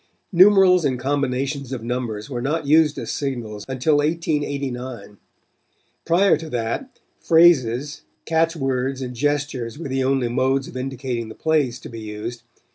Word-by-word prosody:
Numerals 185 -1 +6
and 135 -3 0
combinations 135 0 -2
of 125 -4 -4
numbers 115 -3 -3
were 125 -4 -4
not 150 +4 -1
used 150 +1 +4
as - - -4
signals 120 -7 -4
until 135 +3 +1
1889. 140 - -2 0.9
Prior 185 +4 +4
to 160 -1 -8
that, 120 - -3 0.2
phrases, 145 -5 +3 0.2
catch 165 +1 +1
words 135 -2 -2
and 125 -1 -5
gestures 140 -2 -2
were 160 -3 -6
the 130 0 0
only 130 -2 +1
modes 130 +3 0
of - - -11
indicating 130 -3 -4
the - - -10
plays 150 -6 +1
to - - -9
be 115 - -8
used. 110 +2 -6
135 Hz, 145 wpm, -22 LUFS, 125-150 Hz, 0.9 s, Numerals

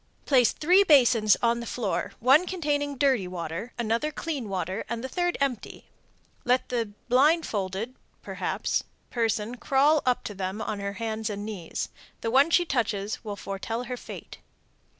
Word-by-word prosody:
Place 250 -5 +4
three 365 +6 +4
basins 245 - +5
on 235 0 +3
the 235 - -6
floor, 220 -6 -2
one 275 +9 +5
containing 290 -5 -1
dirty 260 -9 +2
water, 180 +5 -5
another 235 +6 0
clear 310 -3 -3
water, 190 -2 -3
and 235 +1 -3
the - - -2
third 350 +5 -1
empty. 270 -5 -3 0.5
Let 250 +1 +1
the 230 -4 -2
(blindfolded?) 245 - +1 1.2
person 225 0 -1
crawl 280 +4 +3
up 250 -1 +1
to 210 - -5
them 190 +1 -4
on 215 -1 -3
her 200 0 -3
hands 220 0 -3
and 205 0 -4
knees. 195 -7 -4 0.3
The 225 - -1
one 275 +5 +5
she 350 +1 +4
touches 220 -8 -1
will 210 -2 -4
foretell 200 +5 -4
her 250 0 -4
fate. - - -10
235 Hz, 150 wpm, -27 LUFS, 210-275 Hz, 1.2 s, basins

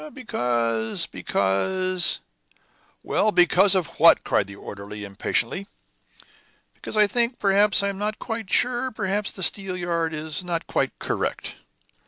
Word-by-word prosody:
"Because 120 - -1
because 185 - +1 0.4
" - - -38
"Well, 215 - +1
because 185 +2 +5
of 180 -5 -2
what?" - - +6
cried - - +1
the 100 - -9
orderly, 100 +1 -8
impatiently. 100 - -2 1.1
"Because - - -7
I 210 - +7
think, 240 +3 0
perhaps 200 0 +3
I 200 - +1
am 195 -1 -6
not 210 +1 -2
quite 225 -4 -5
sure 250 +1 +1
perhaps 205 -2 -2
the 190 - -6
steelyard 175 -4 -1
is 155 +2 -5
not 170 -2 -3
quite - - -1
correct." - - -3
185 Hz, 135 wpm, -24 LUFS, 150-205 Hz, 1.1 s, I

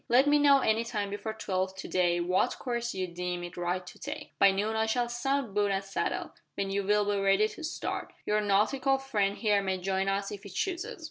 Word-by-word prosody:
"Let 250 +3 +6
me 295 0 +4
know 280 -1 +6
any 220 0 +2
time 210 -4 -3
before 220 +2 -4
twelve 190 -3 -2
to 190 - -7
day 175 -1 +2
what 180 +2 +1
course 240 -2 -3
you 185 -1 -1
deem 180 0 -4
it 175 +1 -7
right 180 +1 -2
to - - -12
take. 295 +1 -7
By 200 - +7
noon 205 +3 0
I 220 0 +1
shall 240 +2 +1
sound 250 -1 -1
boot 205 0 +2
and 195 0 0
saddle, 195 0 -3 0.2
when 195 -1 -2
you 200 0 0
will 210 +1 +2
be 205 -1 0
ready 195 +2 +4
to 330 - -10
start. 315 - -4
Your 210 0 +2
nautical 255 +7 +2
friend 210 -7 0
here 210 -3 +2
may 190 -1 -1
join 190 +1 -1
us 195 0 -1
if 205 - -7
he 200 - -10
chooses." 355 - -3
205 Hz, 225 wpm, -29 LUFS, 195-240 Hz, 0.2 s, By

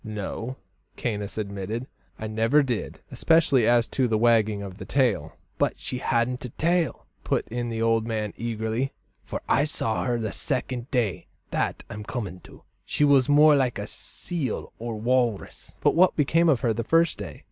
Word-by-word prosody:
"No," 110 +4 -5 0.4
Caius 105 -3 -3
admitted, 105 +3 -4 0.3
"I 110 - -6
never 115 +7 +3
did 125 -5 -3
especially 155 -8 +3
as 120 -1 +4
to 130 -2 +1
the 110 -2 +1
wagging 110 -3 +3
of 95 -1 -8
the - - -6
tail." 120 - +1 0.3
"But - - +1
she 125 - -4
hadn't 125 0 0
a 125 - -4
tail!" 170 +6 0 0.2
put - - 0
in 120 0 -3
the 115 0 -2
old 115 0 +2
man 110 -3 -2
eagerly, 115 +3 -2 0.3
"for - - -6
I 145 - +3
saw 115 -7 -1
her 120 -2 +1
the 110 -3 -3
second 130 -1 -2
day 115 - -1 0.2
that - - -1
I'm 105 +1 -7
coming 100 -6 -5
to. - - -15 0.2
She - - 0
was 140 -2 +5
more 150 +1 +7
like 130 -3 +1
a 100 - -4
seal 145 - -4
or 115 0 -4
walrus." 120 -2 -1
"But - - +4
what 185 +2 +4
became 165 +3 +3
of 135 -6 +3
her 120 -4 +2
the 115 +2 -2
first 165 +3 +2
day?" - - -7
120 Hz, 180 wpm, -25 LUFS, 110-135 Hz, 0.4 s, more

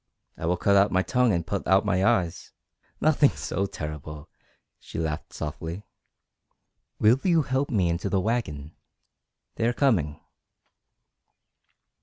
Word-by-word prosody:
"I 80 - -4
will 90 +1 +1
cut 100 +3 +2
out 100 +1 +4
my 95 0 +2
tongue 125 +1 +2
and 85 -4 -1
put 95 +1 -3
out 95 +2 +4
my 95 -2 +1
eyes 90 -3 0 0.2
" - - -40
"Nothing 150 -2 +4
so 100 +1 -3
terrible," 75 -2 -7 0.5
she - - -10
laughed 80 -2 -3
softly. 80 +5 -6 1.2
"Will 115 +5 +5
you 170 -4 +3
help 135 +1 -1
me 100 -8 +1
into 85 +4 -1
the 95 0 +1
wagon? 85 -9 -3 0.8
They 115 - +1
are 120 - +1
coming." 90 - +1
95 Hz, 140 wpm, -26 LUFS, 80-115 Hz, 1.2 s, Will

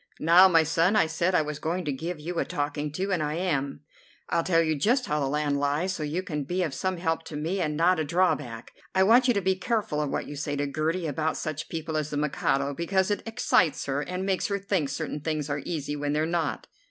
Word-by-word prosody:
Now, 175 +4 +7
my 165 -3 +5
son, 165 +5 +2
I 215 - +5
said 170 +3 0
I 155 - +4
was 150 0 -5
going 175 +2 -2
to 145 - 0
give 160 +5 -4
you 170 +3 -4
a - - +2
talking 145 +1 -3
to, 190 +5 -2
and 180 -4 +1
I 150 0 -1
am. 145 -6 -1 0.5
I'll 170 - +2
tell 165 -2 +3
you 160 -1 +1
just 245 - +2
how 150 - 0
the 140 - 0
land 145 0 0
lies, 145 +6 0
so 170 - -5
you 155 +5 -2
can 150 -6 -3
be 180 +6 -1
of 155 -5 -2
some 185 +5 -2
help 165 -2 -1
to 155 - -8
me 165 +6 -2
and 150 -3 -1
not 175 +2 +3
a - - +1
drawback. 145 -8 0 0.2
I 190 - +5
want 240 +6 +5
you 245 - +3
to 200 - +1
be 190 +1 +2
careful 190 -6 -1
of 150 - -1
what - - -2
you 145 - -7
say 145 0 -3
to 145 0 -1
Gertie 160 +5 -1
about 155 +1 -1
such 155 -1 -4
people 160 -1 -3
as 155 -1 -2
the 150 - -3
Mikado, 140 -1 0
because 190 +5 0
it 205 - 0
excites 185 -7 +2
her 140 +1 -1
and 180 +4 -4
makes 190 -1 0
her 200 - -1
think 190 -7 -1
certain 150 +1 -4
things 150 -1 -2
are 145 0 -2
easy 150 -3 -3
when 145 0 -2
they're 155 +1 +1
not." 170 0 -1
160 Hz, 250 wpm, -27 LUFS, 150-185 Hz, 0.5 s, Now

